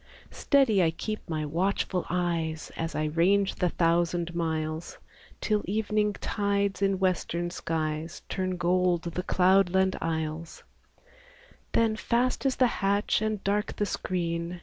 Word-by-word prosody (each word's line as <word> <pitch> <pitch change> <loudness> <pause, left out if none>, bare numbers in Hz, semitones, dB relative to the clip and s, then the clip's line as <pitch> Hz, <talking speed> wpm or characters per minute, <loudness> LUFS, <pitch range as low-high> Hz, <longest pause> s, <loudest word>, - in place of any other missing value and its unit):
Steady 265 -9 +3
I 165 - +4
keep 215 +6 -5
my 155 -2 -2
watchful 180 +3 -1
eyes, 165 -3 -1
As 165 -2 -3
I 155 - 0
range 185 +6 +2
the 180 - +1
thousand 170 0 +1
miles. 160 -1 -3 0.4
Till 210 -1 +1
evening 210 +1 0
tides 200 -1 -1
in 195 -1 +2
western 175 -2 -1
skies 160 -1 -3
Turn 185 -1 -2
gold 175 0 +2
the 170 +1 -3
cloudland 190 +1 +3
isles; 160 0 -3 1.1
Then 225 -1 +3
fast 250 +4 0
is 265 - +1
the 255 - +4 0.2
hatch 200 +2 +2
and 215 -2 -2
dark 205 +1 0
the 205 - 0
screen. 170 -2 -3
180 Hz, 130 wpm, -28 LUFS, 165-200 Hz, 1.1 s, I